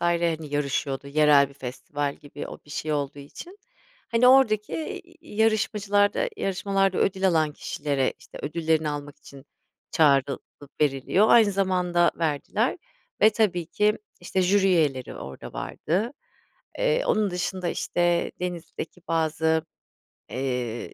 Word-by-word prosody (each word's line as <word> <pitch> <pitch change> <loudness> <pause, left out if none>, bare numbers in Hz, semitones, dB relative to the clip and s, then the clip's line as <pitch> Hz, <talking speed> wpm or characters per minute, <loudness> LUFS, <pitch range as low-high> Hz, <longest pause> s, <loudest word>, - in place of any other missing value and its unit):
hani 170 -2 0
yarışıyordu. 140 -1 -1
Yerel 145 -1 +5
bir 140 - -17
festival 140 +2 -4
gibi 145 0 -9
o - - -8
bir 145 - -17
şey 155 +1 -3
olduğu 145 -1 -2
için, 340 - -11 0.5
hani, 235 +2 +4
oradaki 225 -6 +4
i 325 +4 -4 0.2
i 315 -10 -12
yarışmacılarda 210 - +2
yarışmalarda 195 - 0
ödül 190 0 +2
alan 160 -4 +2
kişilere 140 -2 -2
işte - - -13
ödüllerini 160 0 0
almak 145 -1 -5
için 140 -2 -14 0.5
çağrılıp 140 -3 +3 0.4
veriliyor, 150 +8 +2
aynı 220 -4 +6
zamanda 180 -3 +2
verdiler 155 -4 0 0.4
ve 215 - +7
tabii 195 -6 0
ki 210 +5 +1 0.2
işte 185 +2 -1
jüri 195 +2 +3
üyeleri 150 -9 +1
orada 65 0 -9
vardı. 205 - -2 0.7
Eee, - - +2
onun 215 -2 +2
dışında 180 0 -2
işte 175 0 0
Denizli'deki 175 -1 -5
bazı, 160 0 +1 0.7
eee, 125 -3 -3
170 Hz, 125 wpm, -25 LUFS, 145-200 Hz, 0.7 s, ve